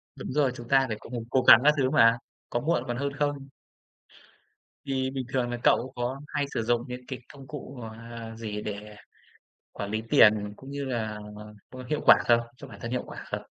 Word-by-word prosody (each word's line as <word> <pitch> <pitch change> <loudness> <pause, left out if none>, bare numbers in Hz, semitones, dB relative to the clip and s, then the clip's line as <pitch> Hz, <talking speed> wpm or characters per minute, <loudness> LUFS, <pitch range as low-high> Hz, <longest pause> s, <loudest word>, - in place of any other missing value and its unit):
Đúng - - -6
rồi, 140 -2 +2
chúng 120 -1 -9
ta 135 0 +4
phải 110 -2 -3
cố - - -13
cùng 120 -2 -4
cố 130 - +3
gắng 120 - +9
các 150 +1 +6
thứ 130 -2 +2
mà, 115 -1 +5 0.3
có 120 - 0
muộn 165 +6 0
còn 120 0 -2
hơn 140 0 -2
không. 145 -2 -2 1.4
Thì 130 -1 -1
bình 130 -2 -4
thường 125 -2 +1
là 120 - -3
cậu 130 +2 +3
có 125 +3 -3
hay 145 -1 -1
sử 115 - -1
dụng 120 +1 +1
những 125 0 -6
cái 130 - -5
công 135 -1 -13
cụ, 135 -2 -8
ờ, 115 0 -9
gì 105 -2 -5
để 105 0 -6 0.8
quản 100 0 -5
lý 110 +1 -2
tiền 105 -1 +5
cũng 135 +1 -11
như 140 0 -4
là, 110 -4 -3 0.5
ơ, 130 -1 -9
hiệu 150 - 0
quả - - +9
không? 120 0 +6 0.2
Cho - - -10
bản - - -12
thân 115 - -4
hiệu 125 - -1
quả - - -9
không? - - -3
125 Hz, 215 wpm, -27 LUFS, 115-135 Hz, 1.4 s, gắng